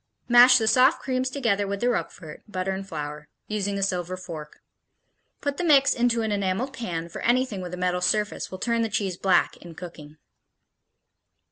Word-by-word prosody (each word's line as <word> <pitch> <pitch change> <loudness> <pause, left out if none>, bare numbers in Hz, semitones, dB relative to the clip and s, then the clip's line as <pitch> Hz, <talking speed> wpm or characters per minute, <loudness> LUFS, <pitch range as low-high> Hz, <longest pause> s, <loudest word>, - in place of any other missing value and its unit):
Mash 245 +1 +8
the 220 -2 0
soft 260 +6 +5
creams 260 0 -1
together 225 -7 0
with 200 0 -3
the 240 - 0
Roquefort, 165 -8 -3
butter 190 -2 -3
and 190 0 -5
flour, 150 -1 -6 0.2
using 200 -1 -2
a 195 - -1
silver 185 -1 -2
fork. 165 -5 -9 0.8
Put 285 -1 -2
the - - -2
mix 280 -4 +5
into 240 -1 +1
an 220 - -1
enameled 200 +6 -1
pan, 170 -10 -4
for 170 - -8
anything 240 -4 +1
with 180 0 -6
a - - -11
metal 180 0 -1
surface 210 +3 0
will 185 - -7
turn 235 +3 0
the 225 - 0
cheese 195 -4 -1
black 180 -1 +2
in 170 -2 -12
cooking. 155 -3 -10
200 Hz, 180 wpm, -25 LUFS, 180-240 Hz, 0.8 s, Mash